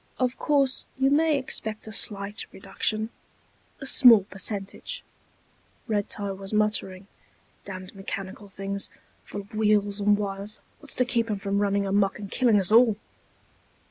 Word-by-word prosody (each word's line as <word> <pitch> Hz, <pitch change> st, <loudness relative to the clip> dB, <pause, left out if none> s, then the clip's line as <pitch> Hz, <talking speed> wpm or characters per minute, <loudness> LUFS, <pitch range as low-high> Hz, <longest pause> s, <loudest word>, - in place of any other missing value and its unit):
"Of 255 Hz, -1 st, 0 dB
course, 275 Hz, -3 st, +1 dB
you 270 Hz, +1 st, +3 dB
may 310 Hz, 0 st, +4 dB
expect 220 Hz, -5 st, -4 dB
a 220 Hz, -, -8 dB
slight 205 Hz, -1 st, -2 dB
reduction... 215 Hz, +3 st, -1 dB, 0.7 s
a 270 Hz, -, -7 dB
small 240 Hz, -6 st, +8 dB
percentage...." 200 Hz, -, -5 dB, 0.8 s
Red 205 Hz, -3 st, 0 dB
tie 200 Hz, -1 st, -2 dB
was 195 Hz, +2 st, -5 dB
muttering. 210 Hz, -3 st, 0 dB, 0.6 s
"Damned 185 Hz, -2 st, -8 dB
mechanical 195 Hz, +1 st, -6 dB
things, 195 Hz, 0 st, -5 dB, 0.3 s
full 200 Hz, -, -6 dB
of 200 Hz, +3 st, -18 dB
wheels 210 Hz, -1 st, +2 dB
and 205 Hz, 0 st, +4 dB
wires. 200 Hz, 0 st, -5 dB, 0.2 s
What's 295 Hz, -2 st, -3 dB
to 250 Hz, -, +2 dB
keep 235 Hz, -2 st, 0 dB
'em 210 Hz, -, 0 dB
from 200 Hz, +1 st, -1 dB
running 200 Hz, -1 st, +1 dB
amok 195 Hz, 0 st, +1 dB
and 200 Hz, -2 st, -8 dB
killing 235 Hz, -5 st, +4 dB
us 190 Hz, 0 st, +1 dB
all!" 225 Hz, -2 st, +6 dB
205 Hz, 145 wpm, -26 LUFS, 195-230 Hz, 0.8 s, small